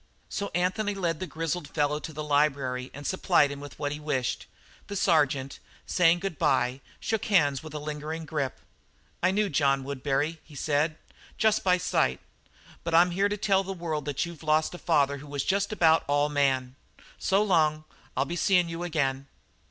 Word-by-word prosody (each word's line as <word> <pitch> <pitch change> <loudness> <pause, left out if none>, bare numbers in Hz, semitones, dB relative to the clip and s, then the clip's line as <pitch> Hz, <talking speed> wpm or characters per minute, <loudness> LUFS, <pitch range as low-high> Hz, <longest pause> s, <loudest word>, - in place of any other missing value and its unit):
So 200 -1 -3
Anthony 195 +4 0
led 170 -5 -1
the 185 - -4
grizzled 165 0 -3
fellow 150 0 0
to 160 - -7
the 155 0 -5
library 140 -4 +1
and 145 +1 -10
supplied 170 -5 +3
him 140 - -6
with 145 -2 -10
what 145 -1 -2
he 150 - -4
wished. 135 -5 -2 0.4
The 200 - -5
sergeant, 145 -7 +1 0.3
saying 175 -1 +3
good 195 -6 -4
bye, 125 +2 +1 0.2
shook 220 -2 -2
hands 145 -9 +3
with 155 -1 -9
a - - -1
lingering 150 +2 -5
grip. 145 -4 -2 0.6
"I 185 - +4
knew 205 +2 +1
John 140 -4 +2
Woodbury," 140 +3 -2
he 150 - -16
said, 155 +2 0 0.4
"just 220 -1 +2
by 180 -1 +4
sight, 65 - +1 0.6
but 170 -1 0
I'm 175 +2 +6
here 195 +3 +1
to 205 - -2
tell 195 -1 +2
the 195 0 -4
world 160 -5 -3
that 145 +1 -1
you've 170 -2 -9
lost 155 +1 +1
a 175 - -8
father 140 -4 +2
who 145 - -11
was 140 -1 -2
just 200 +2 +1
about 165 -6 +4
all 145 +1 +2
man. 135 -3 +1 0.4
So 195 +2 +2
long; 155 -6 +2 0.3
I'll - - +2
be 175 - -4
seein' 180 -1 +3
you 165 +1 -5
again." 140 -5 -1
155 Hz, 185 wpm, -27 LUFS, 145-175 Hz, 0.6 s, I'm